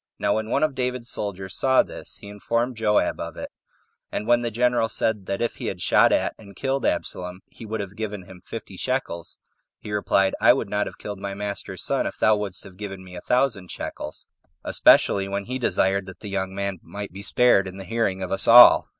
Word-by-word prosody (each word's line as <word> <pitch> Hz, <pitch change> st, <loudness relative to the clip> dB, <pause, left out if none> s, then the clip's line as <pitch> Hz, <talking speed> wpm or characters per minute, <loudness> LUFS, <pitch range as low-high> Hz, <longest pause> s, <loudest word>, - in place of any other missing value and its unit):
Now 100 Hz, -, +1 dB
when 110 Hz, 0 st, -3 dB
one -, -, +1 dB
of 155 Hz, -2 st, +1 dB
David's 125 Hz, -2 st, -3 dB
soldiers 95 Hz, -2 st, -5 dB
saw 130 Hz, -1 st, +4 dB
this, -, -, -7 dB
he -, -, -12 dB
informed 115 Hz, +4 st, -2 dB
Joab 110 Hz, -2 st, +1 dB
of -, -, -6 dB
it; -, -, -6 dB, 0.6 s
and -, -, -3 dB
when 120 Hz, +1 st, +4 dB
the 120 Hz, -, -1 dB
general 120 Hz, 0 st, +1 dB
said, 105 Hz, -3 st, -1 dB
that 100 Hz, +3 st, -1 dB
if 120 Hz, -, -2 dB
he -, -, -5 dB
had 95 Hz, -, -4 dB
shot -, -, +4 dB
at -, -, +1 dB
and 100 Hz, -3 st, -14 dB
killed 135 Hz, +5 st, -1 dB
Absalom, 90 Hz, +1 st, -2 dB
he 115 Hz, -, -11 dB
would 110 Hz, 0 st, -3 dB
have 100 Hz, 0 st, -7 dB
given 105 Hz, -3 st, -5 dB
him 90 Hz, 0 st, -14 dB
fifty 100 Hz, -4 st, -8 dB
shekels, 125 Hz, -9 st, -3 dB, 0.4 s
he 105 Hz, -, -9 dB
replied, 100 Hz, -1 st, +2 dB
"I -, -, +7 dB
would 115 Hz, -6 st, -3 dB
not 105 Hz, 0 st, 0 dB
have -, -, -9 dB
killed 105 Hz, -2 st, -7 dB
my 100 Hz, 0 st, -5 dB
master's 100 Hz, 0 st, -5 dB
son -, -, 0 dB
if -, -, -6 dB
thou 110 Hz, -, +4 dB
wouldst 100 Hz, -3 st, -4 dB
have 95 Hz, -1 st, -13 dB
given 95 Hz, -2 st, -7 dB
me 90 Hz, -1 st, -11 dB
a 90 Hz, -, -7 dB
thousand 120 Hz, -8 st, 0 dB
shekels, -, -, -6 dB, 0.4 s
especially 100 Hz, -1 st, +4 dB
when 100 Hz, 0 st, -3 dB
he 130 Hz, +2 st, -4 dB
desired 100 Hz, -5 st, +1 dB
that 95 Hz, -1 st, -11 dB
the 105 Hz, -, -7 dB
young 95 Hz, -1 st, -2 dB
man 100 Hz, -2 st, -3 dB
might 100 Hz, +5 st, -7 dB
be 100 Hz, -, -8 dB
spared 115 Hz, -2 st, +3 dB
in 95 Hz, +1 st, -8 dB
the 95 Hz, -, -8 dB
hearing 95 Hz, -2 st, -1 dB
of 95 Hz, -, -5 dB
us 95 Hz, -, -1 dB
all." 120 Hz, +1 st, +9 dB
105 Hz, 220 wpm, -24 LUFS, 95-115 Hz, 0.6 s, all